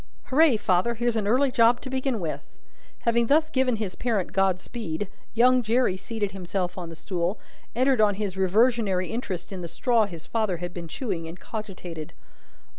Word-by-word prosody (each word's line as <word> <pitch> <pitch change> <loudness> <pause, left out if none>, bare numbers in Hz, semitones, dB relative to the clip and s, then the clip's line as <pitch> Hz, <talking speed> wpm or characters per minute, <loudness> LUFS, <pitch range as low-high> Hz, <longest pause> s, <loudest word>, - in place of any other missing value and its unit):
"Hooray, 285 -2 +5
father! 210 +3 +1
Here's 240 0 0
an 210 -2 0
early 260 +5 +3
job 240 -1 +4
to 265 - -7
begin 260 -3 -1
with!" 165 -4 -6 0.4
Having 235 0 +2
thus 310 +3 +3
given 260 -2 +2
his 210 -4 -3
parent 225 -6 -1
God 190 -1 +2
speed, 205 -4 -4 0.3
young 250 +2 +5
Jerry 235 -3 +2
seated 205 +1 -3
himself 180 -1 -3
on 175 -3 -6
the 165 - -8
stool, 175 +3 -2 0.4
entered 255 -1 +3
on 205 -2 +4
his 200 -2 -3
reversionary 195 -1 +2
interest 200 -6 -4
in 185 - -5
the 170 - -4
straw 230 +3 +2
his 170 -4 -9
father 215 -6 0
had 175 +1 -5
been 170 -2 -6
chewing, 175 - -4
and 170 +2 -9
cogitated. 180 -7 -7
210 Hz, 180 wpm, -26 LUFS, 180-240 Hz, 0.4 s, Hooray